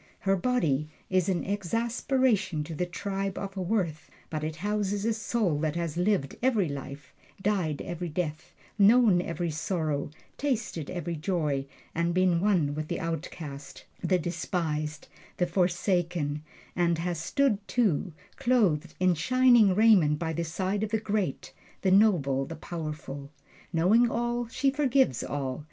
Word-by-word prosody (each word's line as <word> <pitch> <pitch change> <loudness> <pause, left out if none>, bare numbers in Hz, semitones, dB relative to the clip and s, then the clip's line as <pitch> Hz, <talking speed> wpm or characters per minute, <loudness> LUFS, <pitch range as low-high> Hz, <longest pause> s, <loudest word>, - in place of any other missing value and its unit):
Her 195 -3 +2
body 170 - +1 0.2
is 185 -1 +2
an 180 -2 0
exasperation 210 - 0
to 160 +2 -7
the 180 +3 -2
tribe 195 +1 -3
of 195 -1 -5
Worth, 185 -5 -1 0.2
but 155 -1 -3
it 155 0 -3
houses 205 +3 -1
a 230 - +2
soul 215 -7 0
that 155 0 -1
has 170 -2 -2
lived 180 -5 +1
every 230 -8 +2
life, 140 0 -7 0.3
died 190 -7 0
every 175 0 -4
death, 155 -1 -4 0.2
known 205 -3 +6
every 170 -1 -3
sorrow, 155 -3 -2 0.3
tasted 225 - -2
every 170 -1 -3
joy, 150 -5 -1 0.3
and 170 +1 0
been 180 -2 +3
one 180 -8 +2
with 155 +1 -4
the - - -3
outcast, 155 -3 -6 0.2
the 185 - +3
despised, 160 -3 -3 0.3
the 180 - +2
forsaken; 175 -4 0 0.3
and 170 -1 +2
has 170 0 -2
stood, 260 - +1
too, 200 -7 +1 0.3
clothed 215 - +2
in 185 -1 +4
shining 240 +1 +5
raiment 195 -9 +5
by 160 0 -2
the 170 - -1
side 190 +5 -2
of 215 - -1
the 220 +1 0
great, 205 -8 -2 0.3
the 190 - +3
noble, 170 -10 +4
the 165 - -7
powerful. 150 -4 -6 0.4
Knowing 200 +8 +4
all, 240 +1 -1
she 270 +4 +1
forgives 270 - +2
all. 135 -2 -3
180 Hz, 145 wpm, -28 LUFS, 155-210 Hz, 0.4 s, known